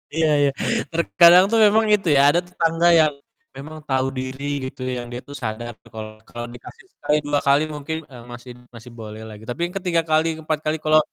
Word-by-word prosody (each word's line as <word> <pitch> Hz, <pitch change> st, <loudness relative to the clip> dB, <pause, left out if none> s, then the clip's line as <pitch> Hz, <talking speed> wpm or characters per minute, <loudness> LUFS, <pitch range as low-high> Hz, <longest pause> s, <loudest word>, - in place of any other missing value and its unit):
Iya 160 Hz, -1 st, +2 dB
iya, 140 Hz, -1 st, +3 dB, 0.4 s
terkadang 170 Hz, +2 st, +6 dB
tuh 225 Hz, -, +3 dB
memang 220 Hz, +2 st, +4 dB
itu 195 Hz, -4 st, -6 dB
ya, 140 Hz, -, +5 dB
ada 170 Hz, -, +3 dB
tetangga 170 Hz, -1 st, 0 dB
yang 155 Hz, -2 st, +3 dB, 0.4 s
memang 155 Hz, +3 st, -9 dB
tahu 130 Hz, 0 st, +1 dB
diri 130 Hz, +2 st, -6 dB, 0.2 s
gitu 130 Hz, -, -9 dB
ya, -, -, -2 dB
yang -, -, -10 dB
dia 120 Hz, +1 st, -6 dB
tuh 145 Hz, -, -9 dB
sadar 120 Hz, +1 st, -5 dB, 0.2 s
kalau 110 Hz, -1 st, -7 dB, 0.2 s
kalau 120 Hz, 0 st, -6 dB
dikasih 120 Hz, -, -13 dB
sekali, 150 Hz, -, 0 dB
2 145 Hz, 0 st, +1 dB
kali 140 Hz, +2 st, +4 dB
mungkin, 150 Hz, +2 st, -4 dB
eee, 120 Hz, -2 st, -11 dB
masih 120 Hz, +1 st, -10 dB, 0.2 s
masih 115 Hz, +2 st, -12 dB
bolehlah. 110 Hz, 0 st, -9 dB, 0.2 s
Tapi 120 Hz, -, -5 dB
yang 180 Hz, -, -15 dB
ke-3 180 Hz, -3 st, 0 dB
kali, 155 Hz, +1 st, +3 dB
ke-4 155 Hz, -1 st, -3 dB
kali 155 Hz, +1 st, 0 dB
kalau 155 Hz, 0 st, +5 dB
145 Hz, 200 wpm, -21 LUFS, 125-165 Hz, 0.4 s, terkadang